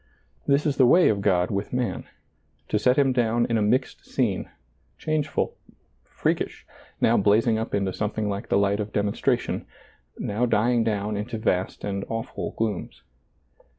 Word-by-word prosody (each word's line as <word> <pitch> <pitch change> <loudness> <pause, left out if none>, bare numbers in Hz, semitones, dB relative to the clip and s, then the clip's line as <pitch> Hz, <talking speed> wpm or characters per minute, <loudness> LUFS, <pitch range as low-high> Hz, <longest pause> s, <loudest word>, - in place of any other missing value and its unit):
This 140 +1 +3
is 145 -3 0
the 130 - +6
way 175 +7 +6
of 100 -2 0
God 90 -3 +2
with 100 0 -2
man, 125 -7 -2 0.6
to 105 - +1
set 125 +4 +3
him 135 -2 +4
down 120 -1 +2
in 115 - -1
a 110 - +2
mixed 125 +5 0
scene, 110 -8 -1 0.5
changeful, 155 -2 -1 0.5
freak - - -1
ish, - - -6 0.3
now - - +4
blazing 110 +2 +3
up 110 - -2
into 100 -2 0
something 105 0 -2
like 100 +3 -4
the - - +3
light 100 0 +2
of 105 0 -3
demonstration 100 -1 0 0.3
— - - -37
now 115 +4 -1
dying 115 +1 +2
down 105 -1 -1
into 110 +3 -4
vast 95 -4 -1
and 100 -1 -2
awful 115 +1 -4
glooms. 110 -4 -3
110 Hz, 165 wpm, -25 LUFS, 100-125 Hz, 0.6 s, the